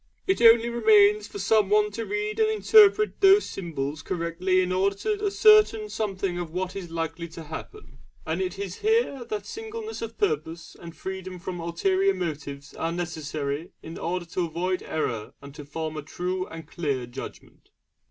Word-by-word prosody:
It 380 - +1
only 230 0 +7
remains 410 - +4
for - - -9
someone 210 - +3
to 225 +2 -5
read 420 +1 -2
and 435 0 +4
interpret 425 -1 +5
these 390 +1 +7
symbols 155 -5 -4
correctly 180 +1 0
in 180 0 -1
order 195 +2 +1
to 420 - -2
ascertain 405 - +5
something 195 -4 -2
of 175 -2 -4
what 185 +2 -4
is 185 -3 -6
likely 165 +1 -4
to 165 0 -10
happen; 150 -3 -10 0.3
and 160 +4 -2
it 185 0 -3
is 195 -2 -5
here 435 - +1
that 210 -3 -4
singleness 445 - -7
of 230 0 -6
purpose 165 -2 -2
and 170 -1 -10
freedom 190 -1 -6
from 180 0 -6
ulterior 190 +3 +1
motives 145 -4 -5
are 165 - -2
necessary 155 -3 -4
in 165 - -8
order 175 +1 -2
to 175 +1 -2
avoid 180 +3 -2
error 115 -9 -3
and 140 0 -12
to 150 - -9
form 155 +2 -5
a 155 - -4
true 180 +5 -3
and 165 -2 -9
clear 140 -8 -2
judgment. 120 - -10
185 Hz, 170 wpm, -26 LUFS, 165-225 Hz, 0.3 s, only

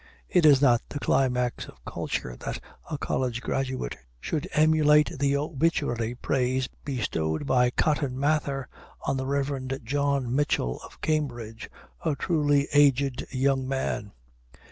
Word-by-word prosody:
It 175 -4 +5
is 145 -1 +6
not 120 -3 +5
the - - -5
climax 125 -3 +1
of - - -16
culture - - -4
that - - -5 0.3
a 155 - -2
college 125 -3 -1
graduate 130 - -2 0.2
should 160 - -3
emulate 150 -1 +4
the 140 0 +2
obituary 140 -6 0
praise 130 0 0 0.2
bestowed 105 - -2
by 125 -2 +3
Cotton 140 -1 0
Mather 140 -2 0 0.4
on 135 - 0
the 130 0 -3
Rev. 135 -1 -1
John 140 -1 0
Mitchell 135 - 0
of - - -14
Cambridge, 120 -7 -2 0.3
"a 155 -3 +1
truly 145 -2 +2
aged 140 -2 +3
young 135 0 +1
man." 130 - -2
135 Hz, 130 wpm, -27 LUFS, 125-145 Hz, 0.4 s, is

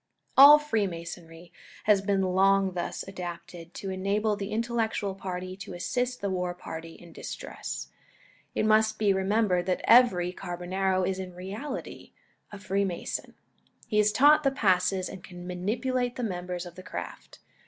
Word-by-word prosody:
All 285 +2 +11
Freemasonry 175 - -4 0.3
has 210 -2 +4
been 195 -1 +1
long 190 +1 +3
thus 175 +1 -4
adapted, 175 -2 -8
to 195 - -5
enable 200 +3 0
the 200 -1 -5
intellectual 225 -3 -1
party 185 -1 -5
to 200 - -8
assist 250 +7 -2
the 200 - -1
war 180 -1 -2
party 165 -1 -8
in 175 - -15
distress. - - -6 0.7
It - - +1
must 215 0 +3
be 205 -2 +3
remembered 190 -2 +1
that 185 - 0
every 190 -8 +5
Carbonaro 185 +2 -1
is 190 0 -2
in 185 -1 -7
reality 205 +10 -7 0.4
a 205 - -8
Freemason. 195 -2 -3 0.5
He 210 - +1
is 210 0 +4
taught 295 +6 +6
the 275 - +3
passes 190 -6 +1
and 185 -2 -9
can 175 -1 -10
manipulate 240 +8 -1
the 250 - -4
members 180 -3 -4
of 175 - -9
the 185 - -10
craft. 185 - -8
195 Hz, 150 wpm, -28 LUFS, 180-215 Hz, 0.7 s, All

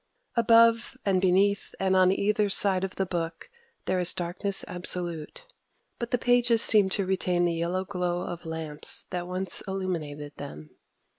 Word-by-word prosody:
Above 230 0 +4
and 190 -2 +2
beneath 195 +2 +2
and 190 0 +1
on 185 0 +5
either 205 +1 +1
side 195 -1 +2
of 190 - -4
the 190 - -1
book 170 - -5 0.3
there 185 - 0
is 180 0 -1
darkness 180 +3 -3
absolute; 175 - -5 0.5
but 235 -1 -4
the 245 - +1
pages 240 -1 +4
seem 205 -3 +5
to 195 0 +1
retain 180 -2 +1
the 170 - +1
yellow 175 +3 -2
glow 180 -2 -2
of 175 -1 -6
lamps 160 -2 -3
that 175 -1 -3
once 185 +1 -3
illuminated 160 -7 -4
them. 75 - -9
185 Hz, 155 wpm, -27 LUFS, 175-200 Hz, 0.5 s, on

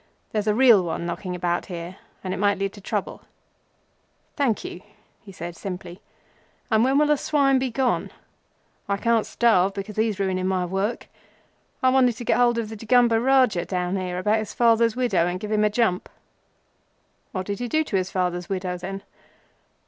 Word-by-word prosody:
There's 215 -1 -2
a 210 - +2
real 240 -5 +6
one 170 0 -3
knocking 180 +1 -4
about 175 -1 -1
here, 175 +1 -7 0.3
and 185 -1 -3
it - - -4
might 205 0 +2
lead 195 0 -2
to 205 - -12
trouble." - - -4 1.1
"Thank 260 -8 0
you," 180 - -7 0.5
said 175 -1 -7
he - - -17
simply, 180 -1 -7 0.7
"and 220 0 +4
when 265 +2 +3
will 300 - +4
the 300 0 +3
swine 275 -2 +2
be 260 0 -1
gone? 250 +1 0 0.8
I 200 - +1
can't 230 +1 +1
starve 200 -5 +2
because 200 +1 -6
he's 215 -2 0
ruining 185 -1 0
my 185 -1 0
work. 195 +5 -2 0.8
I 260 - +5
wanted 255 -3 +3
to 240 - -6
get - - +2
hold 240 -1 +3
of 225 -2 -2
the 220 - -7
Degumber 230 +1 +3
Rajah 255 -9 +3
down 180 0 -2
here 180 -2 -3
about 210 +4 +1
his 215 - -6
father's 230 -1 +3
widow, 205 -10 +1
and 180 +1 -3
give 210 +2 -6
him 215 0 +2
a 210 - +4
jump." 210 -4 0 1.2
"What 185 -2 -4
did 200 +2 -4
he 245 - -3
do 315 +5 +1
to 260 - -4
his 185 -1 0
father's 180 -1 -2
widow, 185 -2 -2
then?" 195 +2 -6
205 Hz, 185 wpm, -24 LUFS, 185-235 Hz, 1.2 s, real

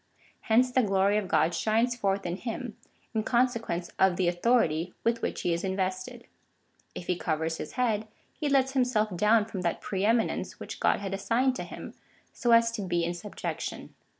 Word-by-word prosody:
Hence 250 +3 +4
the 255 - +4
glory 195 -1 +2
of 210 -3 -1
God 170 -1 +2
shines 225 +6 +1
forth 200 -4 -1
in 175 +1 -2
him, 235 0 -5 0.4
in 220 - +1
consequence 230 -7 0
of 190 -2 +4
the 180 -1 +1
authority 175 -3 +1
with 230 0 +1
which - - -2
he 175 - +1
is 170 - -2
invested. 185 -1 -3 0.7
If 175 - -6
he 180 - 0
covers 160 -1 -1
his - - -7
head, 225 -4 0 0.3
he 295 - -2
lets 265 -1 +3
himself 240 -7 +1
down 210 +4 +4
from 205 -4 -5
that 170 -2 -1
pre 190 -1 -3
eminence 225 +1 +1
which - - -7
God - - +2
had 195 -1 -4
assigned 240 +6 +1
to - - -4
him, - - -9 0.4
so 240 - -2
as 230 0 +6
to 230 -2 -4
be 175 -3 0
in 175 - -1
subjection. 175 +4 -6
210 Hz, 185 wpm, -28 LUFS, 180-235 Hz, 0.7 s, as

